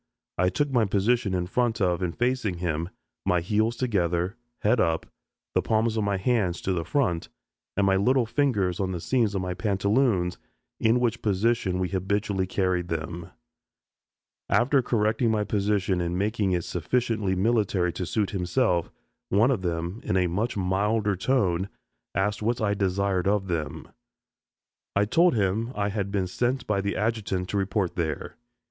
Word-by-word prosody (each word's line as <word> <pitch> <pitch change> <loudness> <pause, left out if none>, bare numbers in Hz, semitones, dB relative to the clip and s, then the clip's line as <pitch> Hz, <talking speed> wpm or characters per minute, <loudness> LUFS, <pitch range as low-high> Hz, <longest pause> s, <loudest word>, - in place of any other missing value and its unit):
I 90 0 +4
took 145 +7 -1
my 120 -4 +3
position 100 0 +1
in 90 -1 0
front 115 +3 0
of 90 -2 +1
and 90 -2 -2
facing 120 -6 0
him, 85 -1 -2 0.3
my 90 -2 +2
heels 110 +6 +1
together, 90 -6 0 0.3
head 110 +3 +3
up, 80 -5 +1 0.5
the - - +3
palms 110 0 +1
of 110 - 0
my 100 -1 0
hands 95 -4 +1
to 95 - 0
the 85 -2 -1
front, 90 - 0 0.5
and 100 - +3
my 95 0 +3
little 125 +5 +3
fingers 110 -9 0
on 95 -1 -1
the 90 - -3
seams 115 +1 +1
of 95 - -1
my 90 0 -2
pantaloons, 100 -1 +1 0.4
in 115 +2 +3
which 120 -1 0
position 105 -2 +1
we 90 -1 -1
habitually 95 0 -1
carried 90 -2 0
them. 85 +1 -4 1.2
After 130 +3 +3
correcting 115 0 +1
my 110 -1 +1
position 100 -3 0
and 85 +1 -1
making 105 0 0
it 90 -2 0
sufficiently 105 +3 -1
military 95 -4 +1
to 90 - -3
suit 100 +5 0
himself, 90 -1 +1 0.4
one 110 +7 +4
of 115 -8 0
them, 85 +3 -3
in 95 - 0
a 90 - +3
much 105 +7 -1
milder 100 +2 +1
tone, 95 -4 +1 0.5
asked 105 +3 0
what 115 +3 0
I 105 -2 +1
desired 95 -1 0
of 100 -1 +2
them. 80 -5 -3 1.1
I 100 +1 +3
told 170 +8 +4
him 110 +3 0
I 100 0 0
had 100 -1 -2
been 100 -2 0
sent 120 +7 -1
by 100 -2 0
the 100 0 -2
adjutant 105 -4 -1
to 100 - -1
report 95 -1 0
there. 80 -3 -3
100 Hz, 165 wpm, -26 LUFS, 90-110 Hz, 1.2 s, I